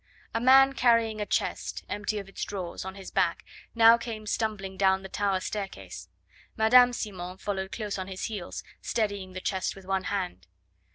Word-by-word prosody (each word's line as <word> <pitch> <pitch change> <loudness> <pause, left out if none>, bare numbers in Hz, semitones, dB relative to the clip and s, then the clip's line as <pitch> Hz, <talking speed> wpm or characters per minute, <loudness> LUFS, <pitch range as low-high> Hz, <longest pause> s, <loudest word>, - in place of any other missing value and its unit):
A 230 - 0
man 270 +2 +7
carrying 230 -4 +3
a 205 - -2
chest, - - -2
empty 205 +1 -2
of 200 -1 -5
its 195 - -6
drawers, 185 -3 -5
on 190 0 -6
his 195 -1 -9
back - - +1 0.3
now 230 0 +7
came 225 -2 -6
stumbling 210 -3 -2
down 190 0 +3
the 190 - -8
tower 200 -1 0
staircase. 200 0 -6 0.5
Madame 245 +3 +7
Simon 185 -6 -5
followed 190 -1 -3
close 210 -3 -4
on 185 - -4
his 190 -1 -6
heels, 205 -6 -5 0.2
steadying 200 -4 -2
the 185 - -5
chest 190 -1 -1
with 195 -1 -13
one 190 0 -1
hand. 180 - -3
200 Hz, 175 wpm, -28 LUFS, 190-220 Hz, 0.5 s, man